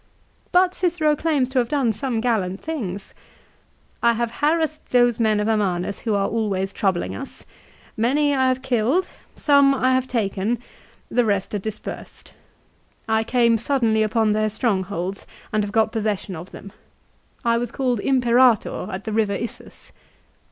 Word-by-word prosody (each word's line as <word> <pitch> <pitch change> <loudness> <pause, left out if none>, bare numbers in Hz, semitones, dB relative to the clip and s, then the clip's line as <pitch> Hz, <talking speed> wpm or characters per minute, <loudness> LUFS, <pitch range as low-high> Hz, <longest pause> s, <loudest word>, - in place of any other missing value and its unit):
But 360 0 +4
Cicero 330 -5 +1
claims 295 -4 +1
to 265 -1 +1
have 240 - 0
done 270 -6 +1
some 240 -1 -2
gallant 200 -6 0
things. 205 - -5 0.9
"1 235 0 +3
have 235 0 -1
harassed 310 0 0
those 245 -2 +3
men 215 -2 +2
of 210 - 0
Amanus 200 -3 0
who 220 -3 -1
are 195 0 +1
always 200 -4 -1
troubling 175 - -1
us. - - -9 0.5
Many 285 +6 +2
I 260 -1 +2
have 255 0 0
killed; 265 +7 +1 0.3
some 280 -2 +4
I 260 0 +2
have 260 0 +1
taken; 220 -1 -1 0.5
the 245 - +3
rest 200 -3 -1
are 205 - 0
dispersed. 215 +2 -7 0.7
I 220 0 +2
came 235 -1 +2
suddenly 230 -4 +1
upon 220 0 +2
their 215 0 +1
strongholds, 195 -4 -2 0.3
and 215 -1 +2
have 205 - -4
got 220 0 +2
possession 210 -4 -2
of 170 +4 -9
them. 200 - -11 0.7
I 230 0 +3
was 240 -1 -3
called 250 -4 0
' - - -12
Imperator 245 -3 +3
' - - -6
at 190 +1 -5
the 220 - -4
river 215 -2 +1
Issus." 230 - -8
230 Hz, 160 wpm, -22 LUFS, 205-260 Hz, 0.9 s, But